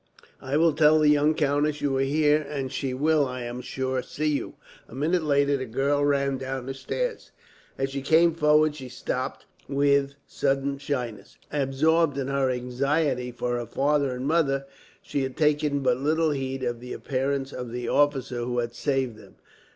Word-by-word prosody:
"I 135 +2 -1
will 165 0 +4
tell 155 +1 +5
the 155 -1 +4
young 150 +1 +4
countess 150 0 +1
you 140 -2 0
are 135 - +1
here; 150 +2 +3
and 135 -3 -3
she 135 -2 -2
will, 145 +2 +2
I 125 -1 -5
am 120 +1 -5
sure, 130 0 -2
see 155 - -5
you." 145 - -2 0.3
A - - -12
minute 165 +6 +1
later, 140 -2 +2
the 130 -1 -5
girl 140 +5 +1
ran 140 -2 +1
down 130 -1 -4
the 135 - -4
stairs. 475 - -4 0.5
As 135 0 -1
she 140 0 -3
came 165 +4 +4
forward 155 -1 +3
she 130 -4 -8
stopped, - - -4 0.2
with 140 0 +2
sudden 140 0 -1
shyness. 125 -8 -4 0.2
Absorbed 145 +2 +2
in 135 -1 -2
her 135 -1 +1
anxiety 125 +1 0
for 120 0 -2
her 120 - -5
father 140 -2 +1
and 125 +1 -5
mother, 140 -3 +1 0.4
she 140 - -2
had 130 -1 -4
taken 150 -2 +2
but 125 -2 +2
little 155 +3 +1
heed 135 -1 -3
of 120 -1 -2
the 125 +1 -7
appearance 135 0 -2
of 125 -2 -6
the 120 0 -4
officer 135 -3 +1
who 120 +1 -2
had 120 -1 -1
saved 130 -2 -1
them. 100 -3 -16
140 Hz, 180 wpm, -26 LUFS, 130-150 Hz, 0.5 s, tell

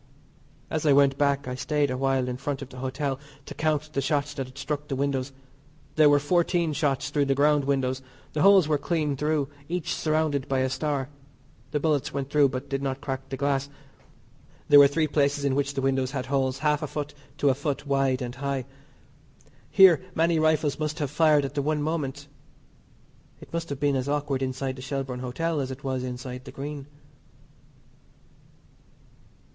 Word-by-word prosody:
As 155 - -1
I 145 - +6
went 140 -1 +4
back 140 -1 +1
I 125 - -3
stayed 145 +2 0
a - - -1
while 135 -1 +1
in 125 0 -3
front 140 +1 -3
of 135 - -11
the 130 - -12
hotel 135 +1 -2 0.3
to - - -8
count 155 -1 -1
the 140 - 0
shots 145 +1 0
that 135 -2 -4
had 130 - -15
struck 145 +1 -4
the 140 - -2
windows. 135 -1 -1 0.6
There 155 -1 +6
were 145 - +6
fourteen 170 +2 +1
shots 145 -1 0
through 145 -1 +2
the 135 0 +1
ground 145 0 +3
windows. 135 -2 0 0.3
The 150 - -1
holes 195 -4 +6
were 150 -2 +1
clean 150 -2 -1
through, 150 0 0 0.2
each 175 -2 -2
surrounded 155 -3 0
by 135 -1 +1
a 130 0 0
star 140 -2 -2 0.6
the 150 +1 -1
bullets 150 -2 0
went 140 0 -4
through 145 -2 +5
but 130 0 -5
did 135 0 -2
not 135 -1 -2
crack 135 -1 -5
the 135 - -4
glass. 140 0 0 1.0
There 145 - +9
were 140 - +9
three 155 +3 +1
places 140 -1 +1
in 140 - +2
which 140 0 -1
the 135 - -2
windows 135 -1 +1
had 130 -2 -4
holes 130 -1 0
half 150 +1 +1
a - - -2
foot 145 -1 -5 0.2
to 145 - +3
a - - +4
foot 145 +1 -3
wide 135 -2 +1
and 120 0 -5
high. 135 -1 -3 1.0
Here 185 -6 +7
many 165 0 +2
rifles 155 -2 +2
must 155 0 -2
have 145 -4 -2
fired 150 -2 +4
at 135 - -5
the 145 - 0
one 150 +1 0
moment. 145 -3 -3 1.1
It - - -14
must 165 0 -3
have 140 -2 -4
been 145 -1 +2
as 130 +1 -1
awkward 145 -2 -1
inside 130 0 -2
the - - -8
Shelbourne 135 -1 -4
Hotel 150 +6 -2
as 135 -2 -2
it 130 +1 -8
was 130 -2 -2
inside 125 0 -6
the - - -8
Green. 140 0 -6
140 Hz, 195 wpm, -26 LUFS, 135-150 Hz, 1.1 s, There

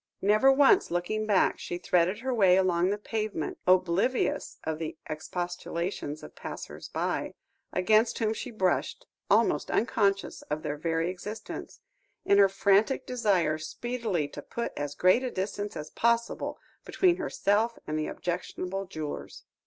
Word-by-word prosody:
Never 215 +7 +5
once 285 +7 +5
looking 195 +5 -1
back, 205 -3 +3
she 175 - -4
threaded 180 +3 +1
her 260 0 -1
way 190 -5 +5
along 180 -1 +2
the 205 - 0
pavement, 210 -6 -3
oblivious 185 +7 +2
of 160 0 -3
the 160 -1 -5
expostulations 170 -1 -4
of - - -10
passers - - -8
by, - - -2 0.4
against 215 +5 +3
whom 220 -2 +1
she 250 - -6
brushed; 190 -6 -1 0.2
almost - - +3
unconscious 200 -3 +1
of 150 +1 -2
their 145 - -2
very 165 +1 0
existence, 210 +4 -8 0.4
in 200 - +5
her 200 -1 +7
frantic 200 +5 +2
desire 190 -11 +1
speedily 215 -2 -2
to 145 - -8
put 235 +10 -4
as 145 0 -4
great 185 +8 +4
a 255 - -1
distance 205 +1 -4
as 150 0 -7
possible 235 0 0 0.3
between 360 -2 +2
herself 230 - +1
and 155 0 -2
the 155 - -1
objectionable 185 +2 -4
jewellers. 155 -4 -6
195 Hz, 145 wpm, -28 LUFS, 170-220 Hz, 0.4 s, her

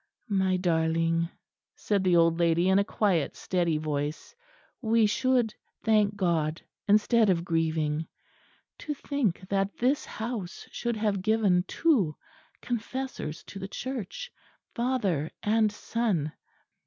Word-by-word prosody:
"My 190 -2 +2
darling," 165 -1 +1 0.5
said 200 -2 0
the 180 -2 +4
old 165 0 +4
lady 170 +1 +3
in 190 +1 +5
a - - +3
quiet 195 -7 0
steady 170 -4 0
voice, 150 - -3 0.5
"we 225 -1 +3
should 240 +1 +2 0.3
thank 210 -2 +3
God 165 -5 0 0.3
instead 215 +1 +4
of 170 -2 +1
grieving. 160 -2 0 0.7
To 295 - -4
think 245 - -2
that 195 0 0
this 260 +4 +2
house 220 -5 -5
should 235 -1 -2
have 210 -3 0
given 200 -4 +2
two 225 - +2 0.5
confessors 245 - -4
to 195 - -9
the 195 - -5
Church, 260 - -5 0.4
father 205 - 0
and 215 0 +3
son! 205 -8 -1
195 Hz, 120 wpm, -28 LUFS, 165-225 Hz, 0.7 s, in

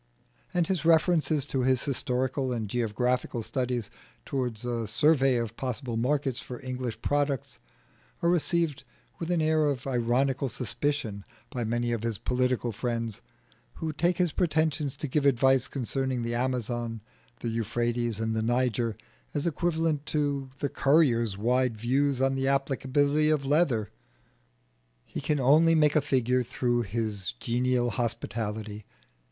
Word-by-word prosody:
And 175 -2 +2
his 185 -1 -1
references 160 -3 +3
to 135 -2 -1
his 130 -1 +2
historical 130 -1 -1
and 115 -3 -2
geographical 120 +2 -1
studies 120 0 -2 0.3
towards 125 -5 -2
a 120 -2 -2
survey 135 +2 +3
of 115 -2 -2
possible 125 -1 -3
markets 135 +2 0
for 125 - -8
English 125 -2 -4
products 145 -2 0 0.6
are 170 - +4
received 170 -3 +1 0.4
with 165 - -4
an 170 -3 +2
air 155 -1 +3
of 135 -3 -3
ironical 130 +2 +1
suspicion 125 -4 -2 0.3
by 125 - -2
many 120 +1 0
of 115 -2 -1
his 115 -2 -2
political 125 0 0
friends, 115 0 -3 0.5
who 160 -1 -3
take 175 +3 +1
his 180 -3 +2
pretension 155 -3 +1
to 150 - -4
give 145 +2 0
advice 135 -1 +4
concerning 130 -1 -2
the 115 0 -2
Amazon, 120 -2 -2 0.4
the 115 - -2
Euphrates, 115 0 -1
and 110 0 -1
the 110 - 0
Niger 120 -1 0 0.4
as 145 - 0
equivalent 160 -2 0
to 140 -3 -1
the 140 - -1
currier's 125 -9 +3
wide 125 +2 +1
views 135 +3 +1
on 135 0 +3
the 135 0 0
applicability 140 +2 +2
of 150 -3 +1
leather. 135 -8 +2 1.1
He - - -6
can 150 +1 0
only 155 +5 +5
make 150 -1 +4
a 155 - +5
figure 130 -3 +1
through 120 0 0
his 105 - -3
genial 120 0 +1
hospitality. 110 -3 -3
130 Hz, 140 wpm, -28 LUFS, 120-145 Hz, 1.1 s, only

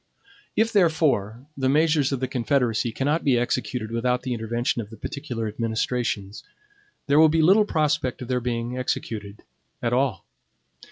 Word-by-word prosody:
If, 225 +1 +2
therefore, 150 - +2
the 130 -1 0
measures 150 -1 +3
of 135 -2 -2
the 130 - 0
Confederacy 125 -2 0
cannot 145 +7 0
be 130 -4 +3
executed 120 -1 -2
without 125 +2 0
the 130 -1 -2
intervention 120 +1 -1
of 105 - -9
the 110 - -11
particular 120 -2 -4
administrations, 110 -2 -2 0.6
there 140 +2 +4
will 160 0 +7
be 160 +1 +2
little 200 +6 +5
prospect 150 -7 0
of - - -8
their 125 0 0
being 120 0 -2
executed 105 -4 -4 0.4
at 120 -2 -1
all. 125 -7 0
125 Hz, 155 wpm, -24 LUFS, 115-145 Hz, 0.6 s, will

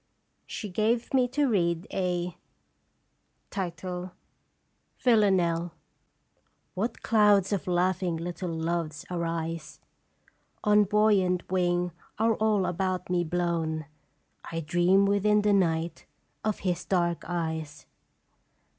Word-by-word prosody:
She 210 - -5
gave 220 +6 0
me 255 -2 +4
to 285 +4 +1
read 170 -6 +1
a 180 -1 -1 2.6
"VILLANELLE. 185 -8 +3 1.0
"What 225 +5 -3
clouds 210 -3 +4
of 195 - -2
laughing 180 -1 +1
little 175 +2 -4
Loves 165 -1 -2
arise 165 -2 -3 0.8
On 210 -1 +5
buoyant 200 -3 +2
wing 175 -1 +1 0.3
are 225 +1 +3
all 215 -3 +1
about 180 0 -2
me 175 -1 +2
blown! 165 -2 -1 0.7
I 165 0 -2
dream 175 +4 +3
within 205 +1 +3
the 205 0 +3
night 165 -3 0 0.4
of 215 -1 -1
his 180 -2 -1
dark 170 -3 0
eyes. 160 -4 -4
180 Hz, 100 wpm, -28 LUFS, 170-205 Hz, 2.6 s, On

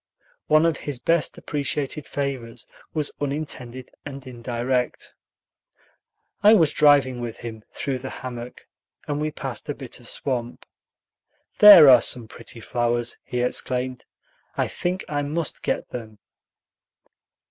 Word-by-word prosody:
One 155 +1 +5
of 165 -2 +1
his 145 -3 -5
best 165 +6 0
appreciated 145 0 -3
favors 125 -4 -4 0.3
was 150 -2 -2
unintended 135 -4 -5
and 140 -2 -8
indirect. 125 0 -3 1.3
I 210 +2 +7
was 165 -7 +4
driving 140 -4 +4
with 120 -2 -5
him 110 -2 -8
through 130 0 -3
the 135 +1 -6
hammock, 125 -1 -8 0.4
and 145 0 -2
we 155 - 0
passed - - -6
a - - -2
bit - - -7
of - - -12
swamp. 120 -3 -3 0.9
"There 205 -8 +11
are 125 -3 +9
some 120 -3 0
pretty 115 - -9
flowers," 120 +1 -1
he 125 - -3
exclaimed; 125 0 -2 0.5
"I - - +1
think 180 +2 -3
I 145 -1 -1
must 150 +2 -3
get - - -2
them." 110 -3 -7
130 Hz, 130 wpm, -24 LUFS, 120-145 Hz, 1.3 s, There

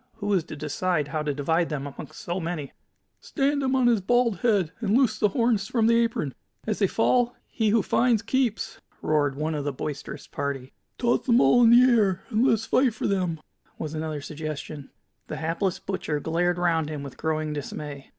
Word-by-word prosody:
who 205 -2 -2
is 185 -4 +2
to 155 - -9
decide 150 +1 -1
how 155 +2 -2
to 150 -1 -1
divide 160 +4 0
them 145 -3 -3
amongst 145 +1 -9
so 175 +2 -3
many?" 165 -4 -4 0.5
"Stand 285 0 0
him 265 -1 +1
on 260 -2 +3
his 235 -4 +4
bald 240 +1 +2
head, 205 -9 +2
and 220 0 +2
loose 230 -5 +2
the 210 - +3
horns 225 -2 +1
from 230 -2 +1
the 230 +1 +4
apron. 160 - -2 0.3
As 215 -2 -2
they 200 - +3
fall, 245 +4 +2
he 220 -2 -1
who 215 -1 +3
finds 235 -3 +2
keeps!" 230 -4 -1 0.2
roared 145 -3 +1
one 155 +3 -2
of 150 -2 -2
the 145 - -1
boisterous 140 +2 -6
party. 140 -2 -4 0.2
"Toss 240 +1 0
them 240 -1 +5
all 245 - +5
in 230 - +7
the 240 +1 +8
air 215 -7 +3
and 220 +1 +2
let 260 - +5
us 225 +1 -5
fight 255 -2 +2
for - - -4
them," 180 -5 0 0.4
was 155 -1 -5
another 155 -1 -3
suggestion. 150 -1 -6 0.4
The - - -5
hapless 170 +4 -1
butcher 160 -6 -3
glared 175 +3 0
round 165 -3 +1
him 150 -2 -5
with 140 - -8
growing 155 -1 -2
dismay. 145 -1 -6
180 Hz, 200 wpm, -26 LUFS, 150-230 Hz, 0.5 s, the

